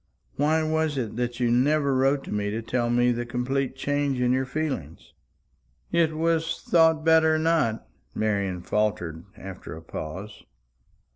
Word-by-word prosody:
Why 155 Hz, +3 st, +2 dB
was 155 Hz, -2 st, 0 dB
it 115 Hz, -5 st, -3 dB
that 120 Hz, 0 st, -2 dB
you 120 Hz, -1 st, +2 dB
never 140 Hz, +3 st, +2 dB
wrote 135 Hz, +1 st, +2 dB
to -, -, -8 dB
me 105 Hz, 0 st, -1 dB
to 110 Hz, +2 st, -3 dB
tell 120 Hz, +1 st, -1 dB
me 120 Hz, +1 st, +3 dB
the 120 Hz, 0 st, -2 dB
complete 125 Hz, +2 st, -2 dB
change 145 Hz, -2 st, -1 dB
in 125 Hz, 0 st, +2 dB
your 130 Hz, +1 st, +1 dB
feelings?" 130 Hz, -, -4 dB, 0.8 s
"It 165 Hz, -2 st, +2 dB
was 165 Hz, 0 st, 0 dB
thought 160 Hz, -2 st, +3 dB
better 160 Hz, -1 st, +5 dB
not," 155 Hz, -8 st, +1 dB, 0.3 s
Marian 100 Hz, -4 st, -1 dB
faltered, 90 Hz, -7 st, -1 dB
after 95 Hz, -4 st, -8 dB
a -, -, -10 dB
pause. 95 Hz, +7 st, -7 dB
130 Hz, 150 wpm, -26 LUFS, 110-155 Hz, 0.8 s, better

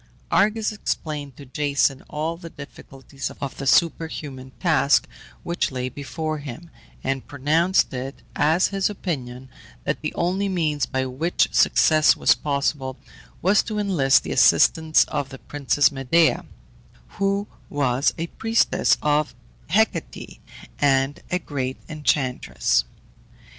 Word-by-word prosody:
Argus 215 Hz, +1 st, +2 dB
explained 150 Hz, -, -4 dB
to 140 Hz, -, -11 dB
Jason 140 Hz, 0 st, 0 dB
all 155 Hz, +2 st, -2 dB
the 165 Hz, 0 st, -10 dB
difficulties 135 Hz, -2 st, -9 dB
of 140 Hz, -2 st, -5 dB
the 135 Hz, -, -4 dB
superhuman 150 Hz, -5 st, 0 dB
task 155 Hz, -5 st, +3 dB, 0.4 s
which 170 Hz, +1 st, -1 dB
lay 130 Hz, -1 st, -3 dB
before 155 Hz, +3 st, -4 dB
him, 145 Hz, +4 st, -9 dB, 0.3 s
and 135 Hz, -1 st, -2 dB
pronounced 155 Hz, +7 st, +1 dB
it 130 Hz, +2 st, -6 dB
as 160 Hz, +5 st, +3 dB
his 195 Hz, 0 st, 0 dB
opinion 130 Hz, -10 st, -5 dB, 0.4 s
that 140 Hz, -, -2 dB
the 150 Hz, -, -2 dB
only 190 Hz, +3 st, 0 dB
means 155 Hz, -8 st, 0 dB
by 130 Hz, 0 st, -1 dB
which 145 Hz, +7 st, 0 dB
success 155 Hz, -1 st, +4 dB
was -, -, +5 dB
possible 140 Hz, -2 st, -2 dB, 0.5 s
was 195 Hz, +4 st, +4 dB
to 215 Hz, -2 st, -5 dB
enlist 160 Hz, -11 st, +3 dB
the -, -, -5 dB
assistance 160 Hz, -1 st, +5 dB
of 145 Hz, -2 st, -3 dB
the 135 Hz, -, -9 dB
Princess 145 Hz, +1 st, +1 dB
Medea, 150 Hz, +4 st, +2 dB, 0.7 s
who 200 Hz, +1 st, +1 dB, 0.2 s
was 135 Hz, -1 st, +1 dB
a 165 Hz, -, -2 dB
priestess 225 Hz, +6 st, +1 dB
of 150 Hz, 0 st, +1 dB, 0.3 s
Hecate, -, -, -1 dB, 0.4 s
and 135 Hz, 0 st, +2 dB
a 180 Hz, -, +1 dB
great 135 Hz, -6 st, -4 dB
enchantress. 145 Hz, -, 0 dB
145 Hz, 125 wpm, -23 LUFS, 135-170 Hz, 0.7 s, was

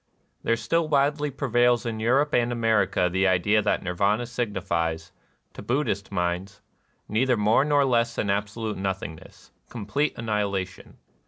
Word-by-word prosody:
There 115 Hz, -, +1 dB
still 165 Hz, +7 st, 0 dB
widely 145 Hz, +1 st, +1 dB
prevails 120 Hz, -2 st, +1 dB
in 115 Hz, -2 st, -3 dB
Europe 135 Hz, +7 st, +2 dB
and 120 Hz, 0 st, +2 dB
America 110 Hz, -6 st, +1 dB
tlie 95 Hz, +2 st, +2 dB
idea 100 Hz, +4 st, +2 dB
tliat 105 Hz, -, 0 dB
Nirvana 100 Hz, +6 st, 0 dB
signifies, 90 Hz, -8 st, -2 dB, 0.4 s
to -, -, -9 dB
Buddbist 105 Hz, -3 st, -2 dB
minds, 90 Hz, +2 st, -2 dB, 0.5 s
neither 125 Hz, +3 st, +1 dB
more 105 Hz, +5 st, +3 dB
nor 145 Hz, -1 st, +3 dB
less 120 Hz, -2 st, +1 dB
than 100 Hz, -, 0 dB
absolute 105 Hz, +2 st, -3 dB
nothingness, 95 Hz, -4 st, -6 dB
— -, -, -41 dB
complete 140 Hz, +6 st, -2 dB
annihilation. 100 Hz, -4 st, -3 dB
110 Hz, 140 wpm, -25 LUFS, 95-120 Hz, 0.5 s, more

